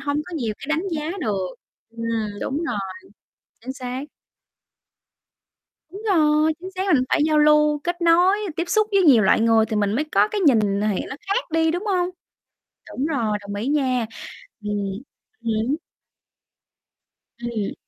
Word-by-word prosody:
hông 285 +1 -1
có 345 - -7
nhiều 230 -7 -2
cái - - -9
đánh 315 +3 +1
giá 310 -1 -2
được. 200 -8 -1 0.4
Ừm, 230 -3 -3
đúng 275 - -2
rồi, 230 -9 -2 0.8
chính 260 +3 -6
xác. 255 0 -5 1.9
Đúng 395 +4 -9
rồi, 310 -2 +3
chính 375 +1 -7
xác, 375 -3 +2
mình 255 -2 +3
phải - - +2
giao 305 -1 +3
lưu, 300 0 +4
kết 350 +1 -2
nối, 350 +3 +5 0.2
tiếp 335 - 0
xúc 430 +3 +3
với 395 - +4
nhiều 265 -10 +6
loại 195 - +4
người 225 -1 +4
thì 215 -1 -2
mình 205 -1 +1
mới 290 +7 0
có - - +4
cái 425 -1 -2
nhìn 280 - +5
thì 205 0 0
nó 265 - -6
khác 400 -1 -2
đi, 325 0 +2
đúng 355 +5 -3
không? 365 -4 +1 0.8
Đúng 270 +4 -2
rồi, 225 -9 0
đồng 200 0 -7
ý 210 +5 -3
nha. 260 -5 +1 0.5
Ừm 210 0 -4 0.7
hứm. 225 +5 0 1.7
Ừm. 230 -4 -3
280 Hz, 160 wpm, -22 LUFS, 225-325 Hz, 1.9 s, nhiều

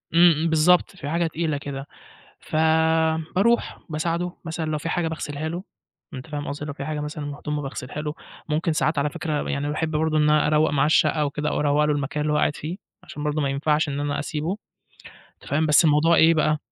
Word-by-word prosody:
إمم 170 +1 +7
إمم، 160 +1 0
بالضبط، 170 +4 +3
في 145 -6 -6
حاجة 170 +2 +1
تقيلة 160 -2 -2
كده 140 -1 -6 0.5
ف - - -8 0.8
باروح 235 +5 +2
بساعده، 170 +3 -1
مثلًا 165 0 -3
لو 155 - 0
في 160 +2 -4
حاجة 175 0 0
باغسِلها 155 -1 -4
له، 175 +3 -5 0.5
أنت 130 +3 -8
فاهم 145 -1 -5
قصدي؟ 145 +1 -5
لو 145 - -5
في 140 0 -6
حاجة 155 0 -3
مثلًا 150 0 -5
م 145 0 -5
هدومه 150 0 -4
باغسِلها 135 +1 -6
له، 150 -1 -3 0.4
ممكن 160 +2 0
ساعات 155 0 0
على 145 +1 +1
فِكرة 150 0 -3
يعني 145 +1 -1
باحب 155 +1 -2
برضه 155 0 +1
إن 150 0 +3
أروّق 150 0 +3
معاه 140 -1 +2
الشقة 155 0 +3
أو 145 - +1
كده. 150 +1 -2
أو - - -1
أروّق 150 0 +3
له 150 - +1
المكان 145 0 -2
اللي 150 0 0
هو - - +2
قاعد 150 - +1
فيه، 165 +5 -5 0.3
عشان 150 - -8
برضه 150 +1 0
ما 140 - 0
ينفعش 150 +2 +1
إن 140 0 -3
أنا 145 0 -1
أسيبه، 155 +5 -3 0.8
أنت - - -21
فاهم. 155 +3 +2
بس 150 +2 +5
الموضوع 155 +2 +4
إيه 160 +1 +6
بقى، 155 -1 +2
150 Hz, 220 wpm, -24 LUFS, 145-160 Hz, 0.8 s, إمم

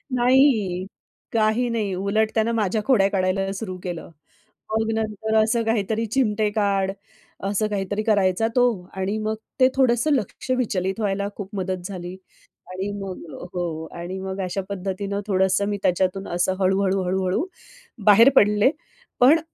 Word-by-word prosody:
नाही, 240 -8 +3 0.5
काही 225 +2 +2
नाही. 215 -5 -1
उलट 200 +4 +1
त्यानं 225 +1 +2
माझ्या 215 0 0
खोड्या 220 -8 +4
काढायला 195 0 0
सुरू 190 -2 -5
केलं. 175 -2 -5 0.6
मग 220 0 0
नंतर 220 0 -2
असं 230 +1 +1
काहीतरी 225 0 0
चिमटे 215 -3 +1
काढ 195 -2 +1 0.5
असं 205 +2 0
काहीतरी 205 +1 -2
करायचा 205 -1 +2
तो 250 - +4 0.4
आणि 195 +3 -1
मग 220 0 0 0.2
ते 255 - +7
थोडंसं 255 +2 +3
लक्ष 255 0 -2
विचलित 195 -4 -1
व्हायला 200 -1 -1
खूप 200 -2 -6
मदत 185 -1 -3
झाली 180 -2 -6 0.6
आणि 190 +2 -3
मग 190 -2 -6 0.3
हो, 165 -3 -3
आणि 175 +2 -6
मग 190 0 -4
अशा 185 +2 -2
पद्धतीनं 200 +1 -3
थोडंसं 190 0 +2
मी 205 - -1
त्याच्यातून 185 +2 +1
असं 185 +1 +1
हळू-हळू 190 0 +2
हळू-हळू 185 - 0 0.6
बाहेर 225 +5 +8
पडले 210 +4 +5 0.5
पण 280 +6 +6
200 Hz, 140 wpm, -23 LUFS, 190-220 Hz, 0.6 s, बाहेर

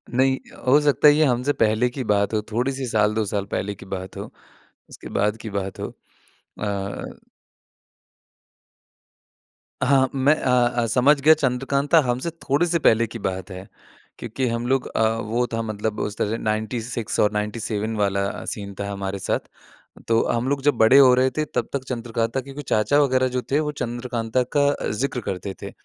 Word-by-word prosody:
नहीं 130 +1 +3 0.3
हो 140 +4 +6
सकता 150 0 +4
है 145 - +8
ये 155 +1 +3
हमसे 125 +2 +1
पहले 110 +3 +3
की 130 +1 -5
बात 100 +1 +1
हो, 110 - +1
थोड़ी-सी 130 +4 -1
साल 105 -2 +2
2 110 - +1
साल 100 -2 -1
पहले 100 +1 -2
की - - -13
बात 95 -1 -6
हो, - - -7 0.6
उसके - - -11
बाद 105 +2 +1
की 110 - -7
बात 95 -1 -4
हो। - - -3 0.7
अ 100 -1 -4 2.7
हाँ, 135 0 +4
मैं 135 +3 +4
अ 130 - -1 0.3
अ, 115 - +1
समझ 130 +6 +3
गया 155 +3 +7
चंद्रकांता 140 +2 +1
हमसे 125 +7 -1
थोड़े 145 +5 +2
से 170 0 +1
पहले 115 -6 +3
की 115 +2 -8
बात 95 -1 -4
है 95 +1 -9 0.5
क्योंकि 120 +3 -3
हम 115 +1 -2
लोग 130 0 +1
अ, - - -1 0.2
वो 115 +3 -1
था 115 - -1
मतलब 110 0 -3
उस 105 0 -3
तरह 110 +2 -1
96 110 +1 -3
और 105 - +3
97 105 +1 -2
वाला 100 -1 -1
सीन 100 -2 -8
था 100 - -3
हमारे 100 0 -4
साथ। - - -1 0.7
तो 115 0 +3
हम 120 +2 0
लोग 140 -1 -1
जब 145 0 +3
बड़े 115 +5 +7
हो 130 -2 +8
रहे 130 +1 +3
थे 155 - +1
तब - - -1
तक 140 -2 -3
चंद्रकांता 115 0 -2
के 135 +1 -11
कुछ 145 - -8
चाचा 110 +7 +2
वग़ैरह 130 -2 +2
जो 125 0 -2
थे 145 +3 +3
वो 150 -1 -2
चंद्रकांता 120 0 -2
का 145 0 +4 0.2
ज़िक्र 125 +3 -2
करते 95 -2 -5
थे - - -6
115 Hz, 180 wpm, -23 LUFS, 105-135 Hz, 2.7 s, है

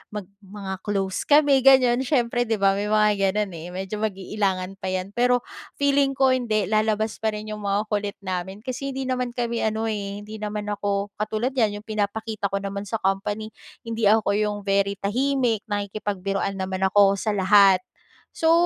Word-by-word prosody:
mag 210 - -3 0.2
mga 195 -1 -7
close 195 -2 -2
kami 290 -2 +5
ganyan 255 -2 +5
siyempre, 245 -3 +1
di 225 - +1
ba? 195 -1 +3
May 200 +1 -1
mga 210 -2 +2
ganun 210 -2 0
eh, 165 +1 -7
medyo 190 +3 -4
mag-iilangan 195 -2 -2
pa 190 - -5
yan, 185 +1 -2
pero 245 +2 +2 0.3
feeling 280 -1 +2
ko 265 -1 +4
hindi, 225 -5 +1
lalabas 215 0 +1
pa 220 -1 -1
rin 215 0 -6
yung 210 0 -6
mga 200 +1 +1
kulit 205 -1 -1
namin 190 +2 -4
kasi 265 +1 -4
hindi 270 - -2
naman 250 -2 -2
kami 235 -1 -1
ano 220 0 -1
eh, 200 -1 -5
hindi 215 +1 -9
naman 210 0 -4
ako 200 0 -2
katulad 215 +4 -1
niyan. 215 -5 0
Yung - - -58
pinapakita 215 0 -2
ko 195 0 -3
naman 200 +1 -4
sa 210 - -3
company 205 +3 -1 0.3
hindi 230 -2 0
ako 215 -1 +4
yung 210 -1 0
very 200 0 +1
tahimik 245 +1 0
nakikipagbiruan 200 -1 -2
naman 190 0 -3
ako 200 0 +5
sa - - +1
lahat. 195 -1 +5 0.5
So, 325 0 +3
210 Hz, 175 wpm, -24 LUFS, 200-230 Hz, 0.5 s, kami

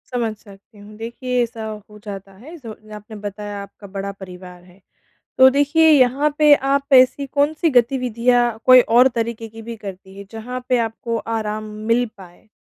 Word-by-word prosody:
समझ 230 -3 -1
सकती 200 +2 -18
हूँ। 205 +1 -14
देखिए, 245 +2 -3
ऐसा 225 -1 -6 0.2
हो 210 0 -14
जाता 195 -1 -8
है, 265 - -13
जो 230 -7 -10 0.2
आपने 210 +1 -11
बताया, 205 0 -7
आपका 200 +1 -14
बड़ा 195 0 -4
परिवार 180 -1 -11
है। 180 +2 -21 0.6
तो 260 0 +9
देखिए, 290 +4 +3
यहाँ 285 +1 +3
पे 300 -1 +7 0.2
आप 280 0 -2
ऐसी 260 +2 +4
कौन-सी 300 +4 0
गतिविधियाँ, 245 -2 +1
कोई 255 0 +9
और 245 +3 +4
तरीक़े 225 0 -4
की 225 +1 -12
भी 230 +1 -7
करती 190 -2 -10
हैं, 200 - -10
जहाँ 250 +3 -7
पे 250 - +2
आपको 230 +1 -5 0.2
आराम 215 0 -4 0.3
मिल 245 +1 +2
पाए? 180 +3 -16
230 Hz, 170 wpm, -20 LUFS, 205-255 Hz, 0.6 s, तो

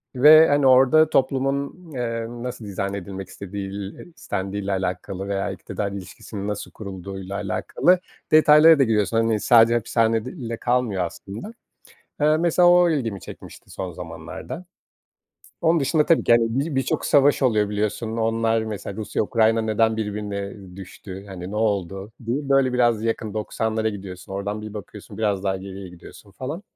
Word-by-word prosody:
ve, 155 +5 +8
hani, 145 -1 +3
orada 135 +5 +6
toplumun, 140 +5 -1
eee, 115 -2 -3
nasıl 120 -1 -7
dizayn 100 0 -3
edilmek 95 -1 -6
istediğil 100 0 -6
eee, - - -10
istendiğiyle 100 0 -4
alakalı 95 +1 -3
veya 100 0 -2
iktidar 100 +1 -5
ilişkisinin 100 +1 -7
nasıl 105 -1 -4
kurulduğuyla 95 -1 -7
alakalı 135 - +1 0.3
detaylara 155 0 +7
da - - +6
giriyorsun. 110 -1 +1
Hani, 115 -1 +2
sadece 115 +1 +5
hapishanede 115 -1 +1
ile 115 -9 -6
kalmıyor 120 -7 0
aslında. 100 - -8 0.7
Eee, 155 +1 +4
mesela, 175 +1 +4
o 175 -1 +5
ilgimi 115 - -2
çekmişti - - -12
son 95 -2 -5
zamanlarda. 90 - -8 1.0
Onun 165 -1 +3
dışında 150 +2 +2
tabii 165 - +3
ki, - - +4
hani, 115 -1 +5
bi 150 -1 -3
birçok 135 - 0
savaş 145 0 +4
oluyor, 105 -5 +2
biliyorsun, 110 +2 -2
onlar, 115 0 +1
mesela, 105 -2 -6
Rusya-Ukrayna 110 +1 +1
neden 110 0 +1
birbirine 105 -2 -4 0.2
düştü, 95 0 -10
hani, 95 -2 -8
ne 105 - -5
oldu 100 -1 -1
diye, 135 +4 -2
böyle, 135 -2 +3
biraz 120 -3 +2
yakın. 110 -2 -2
90'lara 110 +1 -1
gidiyorsun, 95 -2 -8
oradan 100 +2 -4
bir 110 0 -8
bakıyorsun, 105 +1 -10
biraz 100 -3 0
daha 95 -1 0
geriye 95 0 -8
gidiyorsun 90 +3 -14
falan. 145 - -6
110 Hz, 150 wpm, -23 LUFS, 100-130 Hz, 1.0 s, ve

